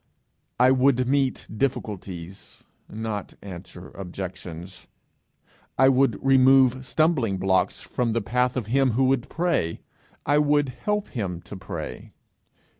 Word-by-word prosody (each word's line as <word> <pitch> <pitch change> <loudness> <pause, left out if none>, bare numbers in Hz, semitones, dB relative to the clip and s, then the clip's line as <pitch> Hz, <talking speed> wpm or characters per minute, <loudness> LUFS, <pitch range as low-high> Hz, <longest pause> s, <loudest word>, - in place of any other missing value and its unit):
I 125 +1 +6
would 130 -1 +3
meet 135 -1 0
difficulties, 95 -7 -4 0.3
not 110 -2 -5
answer 90 -1 -9
objections; 90 -1 -8 0.9
I 130 +1 +6
would 130 -5 +3
remove 130 -1 +5
stumbling 145 - +1
blocks 95 0 +1
from 120 -3 -1
the 115 - 0
path 125 +4 0
of 120 - -2
him 130 +2 +2
who 130 +4 +2
would 130 -2 +1
pray; 165 - -1 0.4
I 145 +1 +3
would 145 -1 +2
help 210 - -2
him 95 -8 -4
to 95 - -10
pray. 95 -9 -7
120 Hz, 120 wpm, -25 LUFS, 95-135 Hz, 0.9 s, I